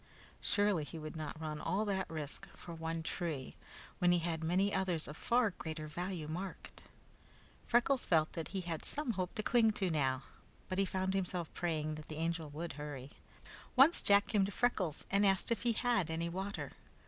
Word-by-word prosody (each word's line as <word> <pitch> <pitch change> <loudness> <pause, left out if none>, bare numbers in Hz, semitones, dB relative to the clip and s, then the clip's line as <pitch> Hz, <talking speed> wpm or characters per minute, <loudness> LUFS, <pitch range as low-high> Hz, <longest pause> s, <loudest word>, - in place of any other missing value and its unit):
Surely 205 -6 +2
he 165 - -7
would 155 0 -6
not 155 -1 -5
run 155 -1 -4
all 205 +3 0
that 190 -2 -1
risk 155 +4 -6
for 170 - -8
one 165 0 -3
tree, 160 -6 -3 0.4
when 175 0 +5
he 175 - +5
had 165 -1 -1
many 185 +5 +2
others 180 -4 0
of 150 - -7
far 235 +4 +2
greater 160 -3 -5
value 170 +1 -4
marked. 180 +5 -6 0.9
Freckles 245 +3 +3
felt 155 -2 +3
that 165 - -3
he 190 -1 -3
had 170 -3 -4
some 295 -4 -1
hope 185 -4 -3
to 215 - -2
cling 235 -1 +5
to 195 -4 0
now, 135 -4 +1 0.5
but 185 - -1
he 195 - +4
found 190 0 -1
himself 180 -3 -2
praying 155 -3 -1
that 155 0 -8
the 155 - -6
Angel 165 -1 -1
would 160 +3 -5
hurry. 145 -2 -6 0.6
Once 275 +6 +8
Jack 200 0 +6
came 210 -3 +2
to 195 - -1
Freckles 190 - 0
and 200 +1 +4
asked 195 +2 +3
if 230 - +1
he 235 -1 +2
had 230 -7 +1
any 165 +1 -1
water. 190 +3 -4
175 Hz, 190 wpm, -35 LUFS, 155-200 Hz, 0.9 s, Once